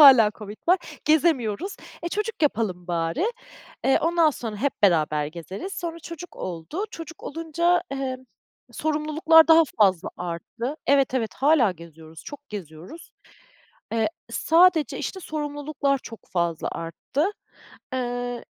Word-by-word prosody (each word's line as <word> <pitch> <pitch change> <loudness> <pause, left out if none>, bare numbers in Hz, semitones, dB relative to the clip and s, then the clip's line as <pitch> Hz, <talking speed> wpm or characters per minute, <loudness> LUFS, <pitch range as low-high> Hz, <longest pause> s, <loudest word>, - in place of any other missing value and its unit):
Hâlâ 255 -7 +9
COVID 210 0 -8
var, 365 +1 +6 0.3
gezemiyoruz. 310 - +2 0.3
"E, 340 - -2
çocuk 420 -1 -3
yapalım 205 -10 0
bari. 170 - 0 0.6
Eee, 270 - +4
ondan 330 -1 +4
sonra 225 -6 -5
hep 275 +5 0
beraber 155 -5 +3
gezeriz." 180 - -7
Sonra 335 -1 -4
çocuk 335 +2 -9
oldu. 180 - -4
Çocuk 330 0 -9
olunca, 330 +3 +1
emm, 260 -1 -3 0.5
sorumluluklar 310 +3 +4
daha 325 0 +8 0.2
fazla 190 -5 +4
arttı 180 - -5
Evet, 275 -2 +3
evet, 230 -4 -1
hâlâ 270 -7 +4
geziyoruz, 160 -1 -13
çok 290 0 -10
geziyoruz. 185 - -9 0.8
Eee, 225 -1 +2 0.2
sadece, 335 -1 +4
işte, 380 - -4
sorumluluklar 290 -3 -2
çok 230 -4 -10
fazla 170 -2 0
arttı. 270 - -2 0.6
Eee 245 -1 -3
270 Hz, 125 wpm, -25 LUFS, 190-320 Hz, 0.8 s, Hâlâ